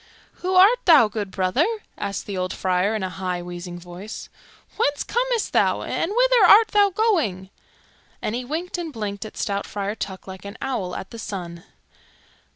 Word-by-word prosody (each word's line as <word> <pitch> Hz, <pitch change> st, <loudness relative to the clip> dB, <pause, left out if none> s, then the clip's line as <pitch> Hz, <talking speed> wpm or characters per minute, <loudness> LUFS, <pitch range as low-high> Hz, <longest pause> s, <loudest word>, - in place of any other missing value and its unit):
"Who 370 Hz, +1 st, -1 dB
art 405 Hz, +7 st, +7 dB
thou, 315 Hz, -10 st, +7 dB
good 205 Hz, -2 st, -4 dB
brother?" 190 Hz, -, +1 dB, 0.3 s
asked 200 Hz, -, -4 dB
the 200 Hz, -, -5 dB
old 185 Hz, 0 st, -2 dB
friar, 185 Hz, +3 st, +1 dB
in 215 Hz, -, -2 dB
a 185 Hz, -, -2 dB
high, 180 Hz, -1 st, -3 dB
wheezing 175 Hz, 0 st, -7 dB
voice. 180 Hz, +5 st, -9 dB, 0.5 s
"Whence 290 Hz, -10 st, +1 dB
comest 485 Hz, -1 st, -1 dB
thou, -, -, +2 dB
and 335 Hz, -, -2 dB
whither -, -, +5 dB
art 440 Hz, +4 st, +7 dB
thou 410 Hz, -1 st, +4 dB
going?" 320 Hz, -, 0 dB, 0.7 s
And 210 Hz, -, -3 dB
he 245 Hz, +2 st, -2 dB
winked 330 Hz, +7 st, -4 dB
and 335 Hz, -2 st, -4 dB
blinked 210 Hz, -4 st, -5 dB
at 215 Hz, -, -10 dB
stout 200 Hz, -1 st, -2 dB
Friar 200 Hz, 0 st, -3 dB
Tuck 190 Hz, -3 st, -6 dB
like 190 Hz, -1 st, -9 dB
an 200 Hz, +2 st, -8 dB
owl 195 Hz, -9 st, -3 dB
at 190 Hz, -, -7 dB
the 230 Hz, -, -8 dB
sun. 175 Hz, -5 st, -6 dB
210 Hz, 175 wpm, -23 LUFS, -, 0.7 s, art